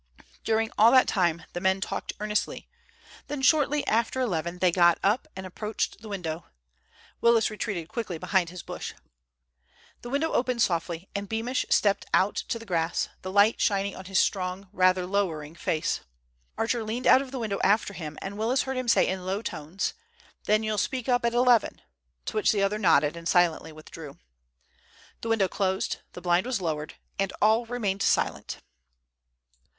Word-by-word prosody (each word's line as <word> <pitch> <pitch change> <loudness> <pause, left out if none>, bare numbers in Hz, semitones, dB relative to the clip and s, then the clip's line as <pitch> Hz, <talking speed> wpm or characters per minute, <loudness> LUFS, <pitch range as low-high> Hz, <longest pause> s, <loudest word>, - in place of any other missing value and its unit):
During 225 0 +1
all 220 +2 +8
that 260 - +6
time 170 -4 +1
the 175 - -4
men 190 +1 +2
talked - - -4
earnestly, 210 0 -2 0.6
then, 290 -2 -4
shortly 295 +1 +3
after 230 +3 +1
eleven, 175 -8 -1
they 180 0 +3
got 175 -1 +5
up 210 +5 +2
and 190 0 -6
approached 210 +3 -4
the 220 - -10
window. 170 -5 -4 0.7
Willis 230 -2 +4
retreated 205 -6 -4
quickly 200 -5 -4
behind 180 +1 +1
his 180 0 -9
bush. - - -6 1.1
The 240 - -8
window 285 +5 0
opened 245 -1 +1
softly 170 +1 -2
and 200 0 -4
Beamish 230 +3 -1
stepped 200 -1 +2
out 195 +2 +2
to 230 - -3
the 230 - -11
grass, 170 -4 -1
the 185 - -5
light 205 +3 +4
shining 200 -1 +1
on 185 - -9
his 190 0 -1
strong, 185 0 0
rather 185 -1 +3
lowering 170 -6 -2
face. 160 -2 -1 0.6
Archer 225 +1 0
leaned 225 +4 -4
out 260 - +7
of 275 - -7
the 265 - -6
window 215 -5 -2
after 205 0 +2
him, 155 -4 -7
and 200 +2 -6
Willis 245 +5 +1
heard 265 -1 -4
him 255 -1 -3
say 230 - +4
in 185 0 -3
low 195 +4 -2
tones, 160 +2 -3 0.5
"Then 215 +1 +3
you'll 215 -1 -1
speak 255 +3 -2
up 245 0 +2
at 235 0 +1
eleven?" 245 -1 +3 0.5
to - - -5
which 430 - +3
the 205 -3 +1
other 205 +2 0
nodded 155 -5 +3
and 170 0 -6
silently 170 -2 +2
withdrew. 155 -1 -11 1.0
The 230 - -4
window 215 -4 +3
closed, 190 0 -1 0.2
the - - -9
blind 175 +4 +2
was 255 -5 -1
lowered, 155 -4 -3 0.2
and 195 -1 0
all 220 +3 +3
remained 210 -5 -2
silent. - - 0
200 Hz, 175 wpm, -27 LUFS, 180-230 Hz, 1.1 s, all